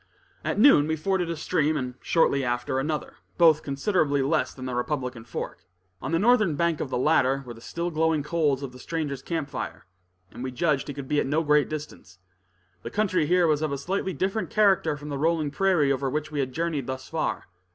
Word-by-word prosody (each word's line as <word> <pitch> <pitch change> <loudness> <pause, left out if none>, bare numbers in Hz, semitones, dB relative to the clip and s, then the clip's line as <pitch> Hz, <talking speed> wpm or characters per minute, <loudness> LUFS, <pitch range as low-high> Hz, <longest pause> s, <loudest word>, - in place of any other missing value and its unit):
At - - -2
noon 210 - +6
we 160 - 0
forded 180 +2 -1
a 170 - -2
stream, 155 -1 0
and 125 -2 -3
shortly 140 -5 +2
after 120 +1 -1
another, 150 +2 -3 0.2
both 160 -3 +6
considerably 145 -1 +1
less 155 +3 +1
than 130 - -9
the 130 - -3
Republican 125 -2 -3
Fork. 110 - -6 0.4
On - - -4
the 165 - +3
northern 215 -4 +3
bank 170 0 0
of 140 - -3
the - - -1
latter, 135 -1 +2
were 120 - -7
the 115 - -14
still 170 +7 -4
glowing 160 -1 +1
coals 150 -3 0
of 135 - -5
the 125 - -13
stranger's 145 -3 -3
camp 165 -2 -3
fire, - - -5 0.5
and 125 - -8
we 130 - -2
judged 140 +2 0
he 145 - -5
could 140 -2 -6
be 150 +1 +1
at - - 0
no 155 +4 +1
great 150 -1 +3
distance. 150 -12 -8 0.6
The - - -6
country 185 -7 +1
here 180 +1 +4
was 155 -2 +2
of 155 -2 -1
a 140 - -1
slightly 190 +6 -2
different 190 +7 -2
character 190 -8 +3
from 150 0 -8
the 140 -1 -3
rolling 160 -1 +1
prairie 170 -4 +2
over 135 0 0
which 150 +3 -3
we 150 - -3
had 130 -2 -1
journeyed 155 -2 -2
thus 130 0 -5
far. 160 -1 -2
150 Hz, 215 wpm, -26 LUFS, 135-170 Hz, 0.6 s, noon